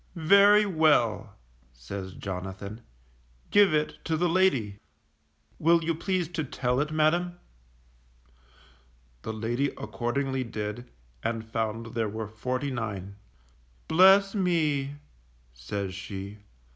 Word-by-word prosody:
Very 200 +5 +6
well_, 155 - +2 0.4
says 95 +11 -7
Jonathan, 95 +3 -6 0.7
give 205 -3 +6
it 150 0 -1
to 160 -1 0
the 175 +2 +2
lady. 140 - +1 0.8
Will 165 +1 +4
you 165 +1 0
please 180 +1 -1
to 165 -2 -3
tell 125 -2 -1
it, 150 +1 0
madam? 170 +3 +1 1.8
The - - -5
lady 115 +5 -1
accordingly 130 +6 -2
did, 110 +1 -5 0.3
and 115 -1 -3
found 115 0 -3
there 115 -2 -1
were 110 +1 -5
forty 125 +6 -3
nine. 100 -5 -5 0.7
Bless 195 +3 +6
me! 155 -8 0 0.6
says 95 +11 -5
she. 100 +2 -7
125 Hz, 105 wpm, -27 LUFS, 105-165 Hz, 1.8 s, Very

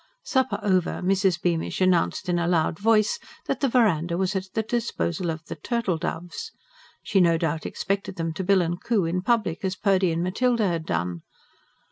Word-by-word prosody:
Supper 260 -1 0
over, 185 -4 +1
Mrs. 190 -2 +2
Bearnish 170 -2 -1
announced 185 -2 +2
in 175 -1 +1
a 170 - 0
loud 165 -2 +1
voice 215 0 +3 0.3
that - - -2
the 275 - +1
verandah 175 -9 +2
was 190 +1 0
at 190 0 -2
the 220 - +1
disposal 210 -7 -2
of 160 0 -4
the - - -6
"turtle 190 +1 -1
doves." 175 0 -5 0.5
She 195 -3 +2
no 170 -2 +4
doubt 160 -1 -2
expected 195 0 -3
them 165 -2 -2
to 190 - -4
bill 190 -1 +4
and 175 +2 -3
coo 215 -7 +1
in 175 +2 -1
public, 210 -6 0
as 190 0 -1
Purdy 190 -4 +2
and 165 +1 -1
Matilda 225 +4 +1
had 165 -3 -2
done. 85 0 -2
185 Hz, 185 wpm, -25 LUFS, 170-200 Hz, 0.5 s, no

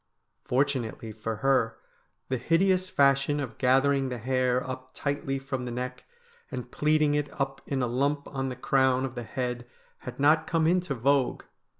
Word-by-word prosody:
Fortunately 125 -4 -1
for 110 +1 -4
her, 130 -5 +2 0.5
the 130 -2 -1
hideous 185 +6 +2
fashion 140 -1 +3
of 135 -5 -5
gathering 135 +1 +3
the 125 - -4
hair 130 +1 0
up 130 0 -7
tightly 140 -1 -2
from 135 -1 -4
the 120 - -4
neck 125 +1 -5 0.4
and 125 -3 -6
plaiting 150 -1 +2
it 145 -1 0
up 135 0 -2
in 135 -2 -1
a - - +1
lump 140 +4 0
on 135 -1 -3
the 125 - -5
crown 130 0 +2
of 130 - -5
the 120 - -5
head 125 0 -4 0.3
had 125 +1 -8
not 155 +3 +4
come 165 -2 +1
into 175 -3 +1
vogue. 135 +2 +1
135 Hz, 170 wpm, -28 LUFS, 125-145 Hz, 0.5 s, not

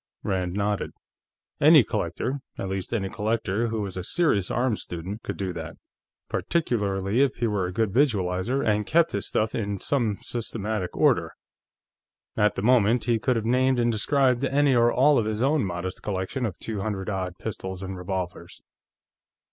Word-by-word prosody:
Rand 90 -1 -1
nodded. 105 0 -1 0.7
Any - - +8
collector 135 +3 -2 0.2
at 95 - -4
least, 95 -1 -4
any 105 -5 -1
collector 110 +1 -1
who 110 -1 -2
was 100 -3 -5
a 90 - -4
serious 105 - +1
arms 120 -3 0
student 90 +6 -6
could - - -5
do 95 -2 -3
that, 80 -2 -7 0.5
particularly 105 - 0
if 140 -2 +2
he 120 - -1
were 105 -5 0
a - - -5
good 110 +2 0
visualizer 115 -1 +1
and 105 -1 +1
kept 170 +1 +3
his 100 - -2
stuff 110 0 0
in 100 -3 -2
some 115 -6 0
systematic 110 -5 -3
order. - - +3 1.0
At 105 0 +2
the 95 - -3
moment, 120 -1 +4
he 115 0 +1
could 125 +3 +1
have 110 -1 -1
named 130 +2 +3
and 120 0 +2
described 130 +3 +2
any 140 0 +3
or 120 -1 +4
all 140 +1 +4
of 110 - 0
his 110 +2 -1
own 145 0 +2
modest 90 -1 -4
collection 105 +6 -2
of 95 - -7
two 110 -3 -4
hundred 100 -2 -3
odd 95 -3 -3
pistols 95 -3 -5
and 95 0 -5
revolvers. 90 -1 -5
105 Hz, 170 wpm, -26 LUFS, 95-120 Hz, 1.0 s, Any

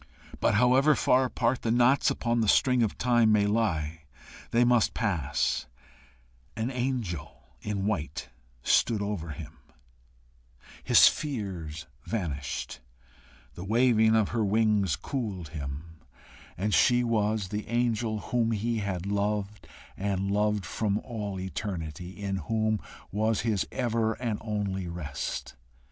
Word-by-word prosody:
But - - +2
however 130 +6 +5
far 130 0 +3
apart 125 0 0
the 115 - -1
knots 120 +4 +4
upon 120 -1 0
the 110 - +1
string 125 +4 +4
of 110 -3 0
time 120 -3 +3
may 105 -1 +4
lie, 80 -8 -1 0.4
they 120 +1 +3
must 120 -2 +3
pass: 90 - 0 0.9
an 110 +4 -2
angel 120 - -3 0.2
in 100 -2 -2
white 80 -8 -3 0.3
stood 110 - +3
over 100 -6 -3
him, 75 0 -9 1.2
his - - +7
fears 95 - -3 0.2
vanished, 70 - -3 0.7
the 90 - -8
waving 110 +1 +4
of 110 -3 +2
her 115 -2 0
wings 105 -4 +2
cooled 100 - -4
him, 75 +2 -7 0.6
and 105 +2 -1
she 125 +3 +4
was 110 -3 0
the 105 +1 -4
angel 115 -1 0
whom 115 0 0
he 115 +2 -1
had 95 -3 -3
loved 100 0 -2 0.3
and 100 0 -1
loved 105 -1 +1
from 100 +3 -1
all 105 -6 -5
eternity, 90 -4 -5
in 100 -1 -2
whom 110 +5 0 0.3
was 110 +1 +1
his 110 -4 0
ever 115 -3 0
and 115 -3 -3
only 100 -4 -2
rest. 80 -5 -5
105 Hz, 125 wpm, -28 LUFS, 95-115 Hz, 1.2 s, his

